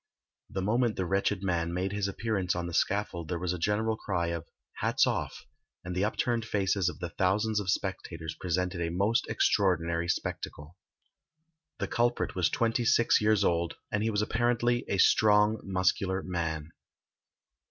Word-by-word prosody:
The 95 - -3
moment 115 +2 +1
the 95 - -1
wretched 95 +1 0
man 85 -3 0
made 95 +2 -1
his 100 -1 -1
appearance 100 -3 -1
on 90 0 -2
the 85 - -6
scaffold 95 -3 0
there 90 - -2
was 90 +1 -2
a 90 - -5
general 110 +5 +1
cry 85 -5 -2
of 85 -1 -4 0.3
"hats - - +2
off," - - -3 0.4
and 90 0 -4
the 95 - +1
upturned 115 +2 0
faces 100 -4 +1
of - - -8
the 90 -2 -5
thousands 105 +4 +1
of 100 -2 -4
spectators 80 -3 -3
presented 90 +1 -2
a 85 - 0
most 100 +9 +1
extraordinary 85 -4 +1
spectacle. 80 -2 -4 1.0
The - - -2
culprit 120 +1 0
was 90 -3 +2
twenty 115 0 0
six 115 -1 +4
years 105 -1 +3
old, 85 -2 +1 0.2
and 105 - 0
he 110 - +1
was 105 -1 +1
apparently 120 +2 +1
a 100 - -1
strong 105 +2 +4
muscular 95 0 0
man. 80 -3 -3
95 Hz, 165 wpm, -29 LUFS, 85-110 Hz, 1.0 s, six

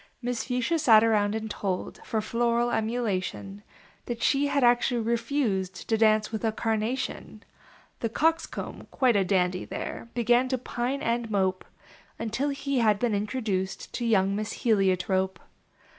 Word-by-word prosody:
Miss 245 -1 -3
Fuchsia 250 +6 0
sat 220 -6 +6
around 210 -2 +2
and 220 0 -3
told, 195 -3 -4
For 220 - -1
floral 235 +2 +1
emulation, 205 -4 -2 0.5
That 235 -1 -4
she 280 +1 +3
had 280 -1 +1
actually 240 0 +3
refused 220 -5 -1
To 225 - +2
dance 215 -1 +3
with 220 0 -4
A 225 - +2
Carnation. 225 +4 -3 0.6
The 230 - -1
Coxcomb, 325 +7 -1
quite 255 -4 +2
a 200 - +4
dandy 180 -1 +1
there, 230 - -6
Began 240 +2 +3
to 260 0 0
pine 250 +2 -3
and 235 0 -1
mope, 190 -3 0 0.5
Until 230 +6 -2
he 275 -1 -1
had 215 -3 +3
been 230 +1 0
introduced 205 -3 -2
To 240 - -3
young 200 -4 +2
Miss 215 +1 -4
Heliotrope. 190 -3 +2
225 Hz, 145 wpm, -27 LUFS, 205-245 Hz, 0.6 s, sat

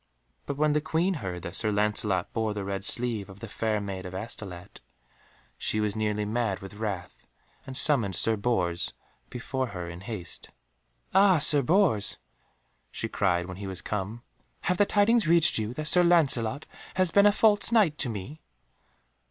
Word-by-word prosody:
But 140 - -4
when 150 0 +2
the 150 - +1
Queen 160 +5 0
heard 90 -3 -6
that 85 - -6
Sir 110 +2 +1
Lancelot 105 -3 0
bore 110 -2 -2
the 100 - -4
red 100 0 -4
sleeve 115 -3 0
of 95 +1 -13
the 115 - -8
Fair 110 0 -2
Maid 100 -2 -6
of 90 - -9
Astolat, 95 -2 -8 0.8
she 110 - 0
was 105 -1 -1
nearly 105 -1 -1
mad 110 -2 -1
with 95 +1 -11
wrath, 100 -4 -6 0.4
and 130 -1 -3
summoned 115 - +3
Sir 110 +5 +3
Bors 95 -6 -1 0.3
before 130 +1 -4
her 90 -5 -7
in 85 +1 -9
haste. 95 -5 -8 0.6
"Ah, 190 -1 +5
Sir 145 -1 +5
Bors," 145 - +2 0.7
she - - -5
cried 90 -3 0
when 90 0 -9
he 100 0 -7
was 95 -2 -5
come, 105 +3 -5 0.4
"have 180 - -1
the 205 - +4
tidings 210 -1 +2
reached 165 -6 +5
you 110 +1 -3
that 155 - -5
Sir 180 +4 +6
Lancelot 140 -6 +2 0.3
has 185 -2 +2
been 200 +3 +5
a - - +5
false 210 +1 +3
Knight 200 -10 +2
to 125 - +4
me?" 115 +9 -7
110 Hz, 175 wpm, -27 LUFS, 100-155 Hz, 0.8 s, Sir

